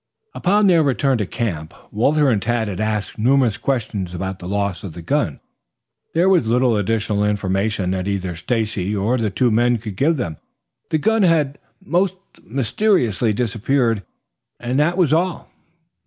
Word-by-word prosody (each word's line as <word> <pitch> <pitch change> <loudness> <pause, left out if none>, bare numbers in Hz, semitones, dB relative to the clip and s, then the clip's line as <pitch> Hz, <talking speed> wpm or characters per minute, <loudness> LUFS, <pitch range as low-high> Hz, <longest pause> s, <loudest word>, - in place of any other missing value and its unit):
Upon 205 +3 +2
their 175 -4 +5
return 135 -2 +1
to 105 - -1
camp, 85 -11 -4 0.2
Walter 140 +6 +2
and 105 -4 +1
Tad 115 +1 0
had 95 -3 -5
asked 110 0 -2
numerous 125 -1 +3
questions 110 -7 -2
about 95 +1 -4
the 90 - -8
loss 100 -2 -2
of 95 -5 -7
the 85 - -8
gun. 135 - -1 0.8
There 170 +3 +3
was 180 -11 +3
little 120 0 +3
additional 105 0 0
information 100 -1 0
that 95 0 -2
either 95 -3 -2
Stacy 105 +1 -2
or 110 +6 0
the 110 -2 0
two 120 +5 +1
men 120 +2 +3
could 105 -3 -7
give 155 - +2
them. 80 - -3 0.5
The 160 - +1
gun 220 +8 +2
had 155 -6 +2 0.3
most 185 +1 +1 0.3
mysteriously 125 - +1
disappeared, 115 +1 0 0.6
that 145 +8 0
was 165 -6 +3
all. 175 +2 -1
115 Hz, 155 wpm, -20 LUFS, 100-140 Hz, 0.8 s, their